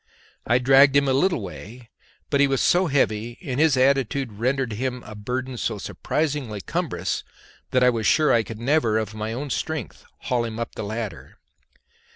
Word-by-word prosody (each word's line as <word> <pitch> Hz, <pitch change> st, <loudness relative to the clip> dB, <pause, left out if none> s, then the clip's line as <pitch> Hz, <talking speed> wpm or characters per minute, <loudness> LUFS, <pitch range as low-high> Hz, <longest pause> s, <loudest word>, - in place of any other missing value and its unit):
I 120 Hz, -, +4 dB
dragged 135 Hz, +2 st, +5 dB
him 140 Hz, 0 st, +4 dB
a 135 Hz, -, +2 dB
little 155 Hz, -, +1 dB
way, 110 Hz, +5 st, -10 dB, 0.4 s
but 140 Hz, -, +2 dB
he 140 Hz, -, +5 dB
was 135 Hz, -1 st, 0 dB
so 180 Hz, +1 st, +3 dB
heavy 120 Hz, -5 st, 0 dB
and 135 Hz, -4 st, -3 dB
his 155 Hz, -4 st, +4 dB
attitude 135 Hz, -1 st, +2 dB
rendered 125 Hz, +2 st, -1 dB
him 125 Hz, +2 st, -3 dB
as -, -, -11 dB
a -, -, -7 dB
burthen 125 Hz, +4 st, -4 dB
so 115 Hz, -2 st, -2 dB
surprisingly 140 Hz, -1 st, -2 dB
cumbrous -, -, -3 dB, 0.5 s
that 125 Hz, 0 st, +2 dB
I 125 Hz, -, +6 dB
was 115 Hz, -2 st, -1 dB
sure 155 Hz, -1 st, +4 dB
I 115 Hz, -, +4 dB
could 110 Hz, +1 st, -8 dB
never 120 Hz, -3 st, +2 dB
of 110 Hz, -1 st, -2 dB
my 110 Hz, +1 st, -4 dB
own 135 Hz, +4 st, -4 dB
strength 160 Hz, -7 st, -4 dB, 0.2 s
haul 125 Hz, -2 st, 0 dB
him 115 Hz, -1 st, -5 dB
up 115 Hz, -, -4 dB
the -, -, -6 dB
ladder. 110 Hz, 0 st, -6 dB
125 Hz, 190 wpm, -24 LUFS, 110-140 Hz, 0.5 s, I